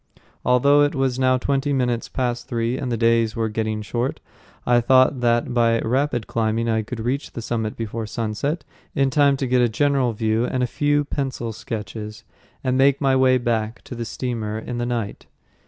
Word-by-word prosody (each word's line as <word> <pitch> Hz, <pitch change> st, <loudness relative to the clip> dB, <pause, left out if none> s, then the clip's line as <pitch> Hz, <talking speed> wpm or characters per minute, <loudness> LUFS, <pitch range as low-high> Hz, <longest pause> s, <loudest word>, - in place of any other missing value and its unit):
Although 140 Hz, +4 st, +4 dB
it 145 Hz, +1 st, +2 dB
was 135 Hz, -2 st, 0 dB
now 130 Hz, 0 st, +3 dB
twenty 140 Hz, +2 st, 0 dB
minutes 125 Hz, -3 st, 0 dB
past 120 Hz, -2 st, -2 dB
three 115 Hz, +1 st, -1 dB
and 130 Hz, -2 st, -3 dB
the 115 Hz, -, 0 dB
days 115 Hz, -1 st, +2 dB
were 115 Hz, -1 st, -1 dB
getting 110 Hz, 0 st, -2 dB
short, 120 Hz, +5 st, -2 dB, 0.5 s
I 120 Hz, 0 st, +4 dB
thought 130 Hz, +2 st, +4 dB
that 120 Hz, 0 st, +1 dB
by 115 Hz, -1 st, +3 dB
rapid 125 Hz, -1 st, 0 dB
climbing 115 Hz, 0 st, -1 dB
I 110 Hz, -1 st, +1 dB
could 115 Hz, +2 st, -7 dB
reach 125 Hz, +5 st, -2 dB
the 115 Hz, -, -5 dB
summit 110 Hz, -2 st, -2 dB
before 115 Hz, 0 st, -4 dB
sunset, 115 Hz, +9 st, -2 dB, 0.3 s
in 135 Hz, -1 st, +2 dB
time 140 Hz, 0 st, +4 dB
to 135 Hz, -, -2 dB
get 125 Hz, 0 st, +2 dB
a 120 Hz, -, +3 dB
general 135 Hz, +1 st, +1 dB
view 110 Hz, +1 st, 0 dB
and 125 Hz, +1 st, -1 dB
a -, -, +3 dB
few 145 Hz, +3 st, +1 dB
pencil 130 Hz, -5 st, -3 dB
sketches, 105 Hz, -1 st, -6 dB, 0.4 s
and 130 Hz, 0 st, +1 dB
make 140 Hz, +1 st, +4 dB
my 135 Hz, -2 st, +2 dB
way 130 Hz, -1 st, +4 dB
back 115 Hz, -2 st, -2 dB
to -, -, -9 dB
the 120 Hz, -1 st, -4 dB
steamer 110 Hz, -4 st, -3 dB
in 120 Hz, +2 st, -5 dB
the 120 Hz, -, -1 dB
night. 115 Hz, -4 st, -4 dB
120 Hz, 190 wpm, -22 LUFS, 115-130 Hz, 0.5 s, Although